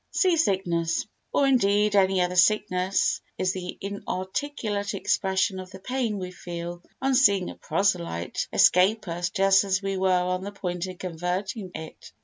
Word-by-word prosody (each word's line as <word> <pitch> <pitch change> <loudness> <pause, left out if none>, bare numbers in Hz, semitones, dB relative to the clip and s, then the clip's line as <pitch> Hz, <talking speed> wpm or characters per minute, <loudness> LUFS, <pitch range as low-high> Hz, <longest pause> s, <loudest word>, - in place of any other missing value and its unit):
Sea 370 -3 +2
Sickness 175 - 0 0.3
Or, 280 - +3
indeed, 210 -5 +3
any 190 -1 +4
other 180 0 0
sickness 185 0 +2 0.2
is 185 0 0
the 180 -1 -6
inarticulate 200 +2 -3
expression 190 0 0
of 185 0 -8
the 190 - -10
pain 235 +1 -2
we 185 -1 -5
feel 175 -1 -7 0.2
on 270 0 +2
seeing 200 -8 +4
a - - -11
proselyte 170 - -1
escape 195 +4 +4
us 175 +1 -2
just 195 0 +4
as 190 -1 +1
we 195 -1 -2
were 190 0 +1
on 180 0 +1
the 200 - -5
point 180 -2 -4
of 185 -1 -8
converting 185 +4 -3
it. 160 - -9
190 Hz, 155 wpm, -26 LUFS, 180-205 Hz, 0.3 s, any